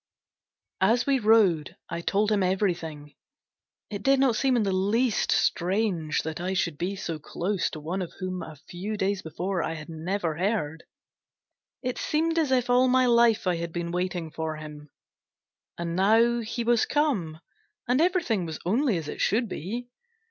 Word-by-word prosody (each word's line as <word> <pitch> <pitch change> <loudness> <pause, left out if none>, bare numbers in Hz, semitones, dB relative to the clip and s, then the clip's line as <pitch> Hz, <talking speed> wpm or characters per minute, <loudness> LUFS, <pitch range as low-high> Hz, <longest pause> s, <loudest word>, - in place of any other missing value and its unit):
As 235 +2 +3
we 275 -1 +2
rode, 210 -8 +3
I 170 - -4
told 205 +4 +1
him 205 -2 +2
everything. 170 -6 -1 0.8
It 205 -1 -4
did 270 +4 +3
not 265 -4 +3
seem 265 +2 +2
in 235 - +2
the 195 - 0
least 215 +5 +1
strange 180 -4 +1
that 160 +2 -4
I 185 +2 -2
should 170 -5 -1
be 185 +3 -2
so 165 -5 -4
close 180 +5 -2
to 155 - -7
one 170 +6 -3
of 175 - -5
whom 185 -1 -3
a 155 - -8
few 195 +4 -5
days 195 0 0
before 175 +3 -3
I 165 0 -2
had 155 0 -9
never 165 0 -2
heard; 175 -5 -1 1.0
it 250 -1 -2
seemed 325 +2 +1
as 300 -5 +1
if 250 -2 +2
all 250 +1 +4
my 255 0 +4
life 235 -3 +4
I 180 -2 +1
had 170 0 -4
been 170 0 -3
waiting 180 -2 -2
for 160 0 -3
him, 150 -1 -10 0.9
and 170 0 -3
now 225 +5 +4
he 230 +1 -3
was 235 -1 +3
come, 205 - 0 0.5
and 250 +4 +3
everything 335 - +1
was 160 -1 -5
only 225 +2 +2
as 160 -3 -5
it - - -5
should 230 +4 +2
be! 225 +7 -5
190 Hz, 175 wpm, -27 LUFS, 170-235 Hz, 1.0 s, all